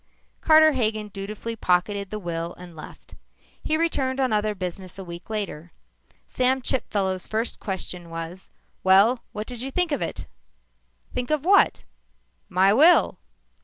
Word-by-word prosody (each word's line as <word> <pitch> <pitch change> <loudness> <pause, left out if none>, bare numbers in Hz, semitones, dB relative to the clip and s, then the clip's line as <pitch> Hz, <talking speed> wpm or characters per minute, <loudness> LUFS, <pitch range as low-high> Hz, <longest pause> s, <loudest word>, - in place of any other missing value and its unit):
Carter 315 0 +6
Hagen 215 -5 -1
dutifully 205 +3 -6
pocketed 200 0 0
the 215 - -4
will 170 -3 -4
and 175 -2 -12
left. 155 - -12 0.5
He 310 - 0
returned 275 -5 0
on 260 -4 +1
other 210 0 0
business 185 0 -6
a 195 - -6
week 170 +1 -10
later. 195 -6 -5 0.5
Sam 255 +1 +2
Chipfellow's 195 -8 -1
first 220 +2 -2
question 180 -3 -5
was, 165 +3 -7 0.3
"Well, 200 +6 +5
what 210 +1 -5
did 245 -1 -7
you 265 - -4
think 355 +3 +1
of 285 - -1
it?" - - -4 0.9
"Think 245 0 -3
of 305 -1 0
what?" 395 +2 +4 0.7
"My 190 +1 +4
will." 315 +9 +5
210 Hz, 145 wpm, -24 LUFS, 185-260 Hz, 0.9 s, Carter